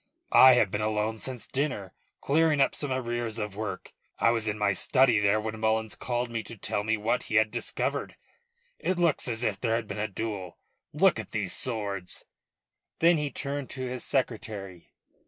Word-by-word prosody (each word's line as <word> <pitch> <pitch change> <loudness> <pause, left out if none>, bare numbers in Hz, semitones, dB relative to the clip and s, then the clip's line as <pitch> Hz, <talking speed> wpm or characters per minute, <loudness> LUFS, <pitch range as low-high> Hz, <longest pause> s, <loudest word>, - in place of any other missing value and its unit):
"I 130 0 +9
have 105 -6 +3
been 105 - -1
alone 110 +1 -1
since 125 -3 -4
dinner, 130 - -2 0.3
clearing 155 +1 +3
up 135 - +3
some 145 -2 -2
arrears 120 -3 -2
of 105 -3 -4
work. 105 -3 -5 0.2
I 115 - +4
was 115 -2 0
in 105 0 -1
my 105 -1 +2
study 125 +2 +4
there 105 +1 +3
when 110 0 -4
Mullins 110 0 0
called 120 -1 -3
me 115 -1 -2
to 115 - -8
tell 100 - -2
me 110 +1 +1
what 115 +4 -1
he 110 - -2
had 110 -1 +4
discovered. - - -2 0.6
It 185 - -1
looks 170 -6 +2
as 115 -1 -2
if 105 -4 -1
there 115 -2 +1
had 115 -2 -2
been 105 - -5
a 110 - 0
duel. 100 -3 -5 0.3
Look - - +3
at - - -6
these - - -1
swords." 100 -6 -3 0.7
Then 170 -1 +4
he 150 -1 -1
turned 140 +1 -3
to 130 - -5
his 125 0 -4
secretary. 110 - -3
110 Hz, 190 wpm, -28 LUFS, 105-130 Hz, 0.7 s, I